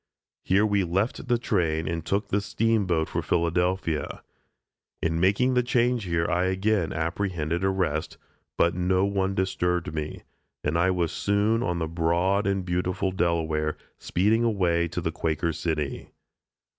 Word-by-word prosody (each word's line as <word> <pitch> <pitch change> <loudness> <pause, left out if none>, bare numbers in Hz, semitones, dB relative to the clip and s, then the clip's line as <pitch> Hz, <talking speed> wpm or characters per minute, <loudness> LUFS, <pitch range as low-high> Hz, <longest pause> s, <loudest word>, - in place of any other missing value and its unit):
Here 100 +3 +3
we 100 -2 +2
left 95 +10 -1
the 120 -1 +3
train 85 -9 0
and 85 0 -2
took 100 +5 -1
the 100 - +1
steamboat 100 -6 +1
for - - -2
Philadelphia. 85 -1 -1 0.8
In 80 0 0
making 100 +8 +3
the 125 - +4
change 120 -2 +1
here 85 -1 0
I 90 +1 +1
again 95 -1 +1
apprehended 85 0 -2
arrest, 90 -5 -1 0.4
but 85 - +3
no 90 +2 +1
one 100 -1 0
disturbed 90 -3 -1
me, 75 -1 -5 0.4
and 75 +2 0
I 85 +3 +3
was 90 -3 0
soon 105 +3 +1
on 90 -6 -1
the 80 -1 -1
broad 85 +5 +1
and 95 -2 0
beautiful 90 +2 -1
Delaware, 80 -4 0 0.2
speeding 110 +6 +1
away 90 -7 +1
to 90 +2 -4
the 80 -1 -1
Quaker 80 +1 -1
City. 75 -3 -3
90 Hz, 145 wpm, -26 LUFS, 85-100 Hz, 0.8 s, the